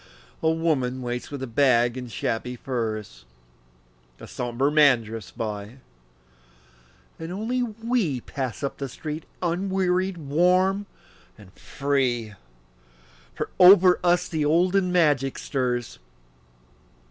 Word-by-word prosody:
A 160 - +2
woman 140 -6 0
waits 120 0 -4
with 130 -4 -6
bag 120 -3 +3
and 125 -2 -7
shabby 115 +5 -3
furs, 110 - -4 1.0
A - - -10
somber 125 +3 -1
man 145 -6 +5
drifts 110 -3 -8
by, 105 +2 -6 1.4
and 165 +1 -6
only 225 +7 -2
we 225 - -1
Pass 130 +1 -5
up 140 - -4
the 140 -1 -4
street 155 +5 -6 0.2
unwearied, 185 +1 0
warm 180 +6 +2 0.5
and 95 -3 -16
free, 125 -6 -1 1.0
For - - -4
over 185 0 +8
us 175 0 +2
the 160 -2 -2
olden 180 +5 +2
magic 145 -7 +2
stirs. 125 - -3
140 Hz, 110 wpm, -24 LUFS, 120-180 Hz, 1.4 s, over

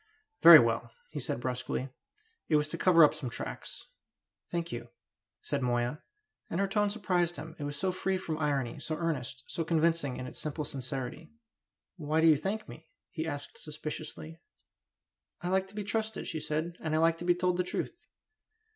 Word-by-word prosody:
"Very - - +13
well!" - - +2 0.2
he - - -4
said - - -1
brusquely. 125 +1 -2 0.6
"It 155 - +4
was 150 0 +3
to - - -2
cover 170 -3 +7
up 150 - +6
some 150 -5 -5
tracks." - - -6 0.6
"Thank 170 -1 -2
you," 120 - -6 0.5
said 145 -1 -1
Moya; 120 +3 0 0.5
and 170 - -2
her 200 - +2
tone 205 +1 +2
surprised 180 -5 0
him, 160 +1 -8
it 145 - -3
was 145 0 -4
so 185 +5 +1
free 190 +1 0
from 160 -4 -4
irony, 140 -6 0
so 155 - -3
earnest, 135 -6 -3
so 165 - -3
convincing 165 -4 +1
in 130 - -5
its - - -6
simple 150 0 -3
sincerity. 135 +4 -5 0.7
"Why 155 -1 0
do 160 - +4
you 160 -2 +8
thank 215 +7 -3
me?" 160 +1 -11 0.2
he 160 +1 -3
asked 145 -2 -5
suspiciously. 155 +1 -6 1.0
"I 175 - -1
like 190 +1 +2
to 195 - -15
be 210 - -2
trusted," 220 +2 -2
she 160 - -3
said. 160 +3 -2
"And 155 -1 -1
I - - +3
like 165 +1 +3
to 175 - -5
be 175 0 +4
told 180 0 +1
the 180 - +2
truth." 340 - -4
160 Hz, 185 wpm, -31 LUFS, 145-175 Hz, 1.0 s, Very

